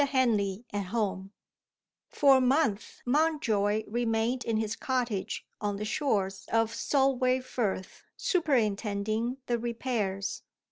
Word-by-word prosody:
HENLEY 230 -6 +1
AT 205 -1 -1
HOME 195 -2 -2 0.8
FOR 275 -2 +5
a - - +2
month, 255 -5 +1
Mountjoy 240 -8 +2
remained 235 +2 0
in 225 -1 0
his 220 0 -1
cottage 240 -7 -2 0.2
on 205 -1 -1
the 210 +1 -4
shores 200 -6 -1
of 225 0 +2
the - - -7
Solway 260 -2 +2
Firth, 225 -7 -3 0.2
superintending 225 - 0
the 240 -2 0
repairs. 225 -5 -2
225 Hz, 120 wpm, -29 LUFS, 205-255 Hz, 0.8 s, FOR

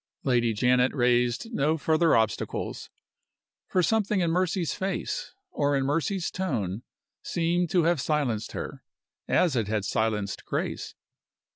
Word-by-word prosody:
Lady 120 -3 +2
Janet 125 +4 +2
raised 125 - +1
no 155 0 +1
further 160 +2 +3
obstacles. 110 -2 -1 0.8
For 185 - +1
something 210 +1 +2
in 170 -2 +1
Mercy's 180 -3 0
face, 280 - -3 0.2
or 145 - +1
in 135 - 0
Mercy's 165 +6 0
tone, 115 - -2 0.4
seemed 170 0 0
to 175 0 +3
have 170 -3 +2
silenced 130 -9 -1
her, - - -6 0.4
as 170 -7 +3
it 115 -4 0
had 105 -2 -1
silenced 105 -3 -1
Grace. - - -3
145 Hz, 130 wpm, -27 LUFS, 120-175 Hz, 0.8 s, further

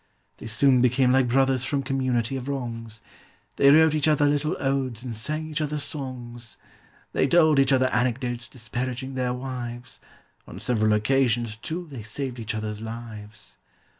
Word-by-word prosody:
They - - -8
soon 125 +3 +4
became 125 +1 +3
like 130 -1 +3
brothers 135 +1 +2
from 135 +1 -1
community 130 -2 0
of 130 0 -5
wrongs: 115 -5 -5 0.5
They 140 - +6
wrote 160 +1 +6
each 155 -1 +1
other 150 -1 +4
little 145 +3 +1
odes 135 -4 -1
and 120 -3 -5
sang 155 +8 -2
each 155 0 -3
other 150 0 -2
songs; 125 -5 -7 0.6
They - - +2
told 155 -1 +5
each 135 0 +4
other 130 -1 +4
anecdotes 120 -1 -1
disparaging 125 +2 -5
their 125 -1 -1
wives; 125 -1 -6 0.5
On - - -9
several 110 -3 +1
occasions, 120 0 +1
too, 165 +10 -5
they 130 -5 -7
saved 125 +4 -5
each 110 0 -4
other's 105 0 -4
lives. 110 -2 -9
125 Hz, 160 wpm, -25 LUFS, 115-135 Hz, 0.6 s, They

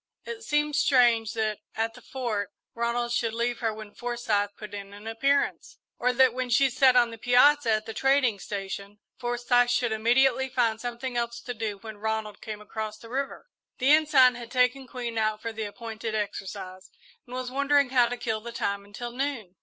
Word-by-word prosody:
It 465 -1 -6
seemed 295 -4 +1
strange 240 -6 +4
that, 215 -2 -1 0.2
at 225 0 -1
the - - -14
Fort, 230 -6 -3 0.2
Ronald 235 +1 -1
should 230 -2 0
leave 235 +1 -1
her 225 -2 0
when 215 -1 -9
Forsyth 235 -4 -1
put 210 -2 -9
in 200 -1 -7
an 205 +1 -12
appearance; 275 +6 0 0.2
or 250 +1 +2
that 255 -1 +4
when 255 0 -3
she 260 +2 +4
sat 255 0 +5
on 240 -2 +4
the 230 - -9
piazza 250 +3 +5
at 215 0 0
the 225 - -6
trading 270 -4 +2
station, 200 +1 -6 0.2
Forsyth 245 0 +2
should 240 -1 +1
immediately 260 +4 +3
find 230 -3 +1
something 245 +1 -4
else 235 0 -2
to 245 - -5
do 215 -3 -4
when 220 +1 -9
Ronald 220 -1 -3
came 215 -1 -6
across 215 0 -5
the 230 - -13
river. 270 +3 -3 0.3
The 265 +2 +3
Ensign 295 -5 +6
had 235 -1 -8
taken 255 +1 +1
Queen 240 -3 -4
out 215 -1 0
for 230 +1 -5
the 220 0 -4
appointed 220 +1 -5
exercise 195 -2 -5 0.4
and 250 - -8
was 255 0 -4
wondering 280 0 +2
how 245 -2 +5
to 245 +1 -4
kill 220 -2 -2
the 235 +2 -7
time 200 -3 -2
until 205 +4 -7
noon. 245 -8 -3
235 Hz, 195 wpm, -27 LUFS, 215-255 Hz, 0.4 s, Ensign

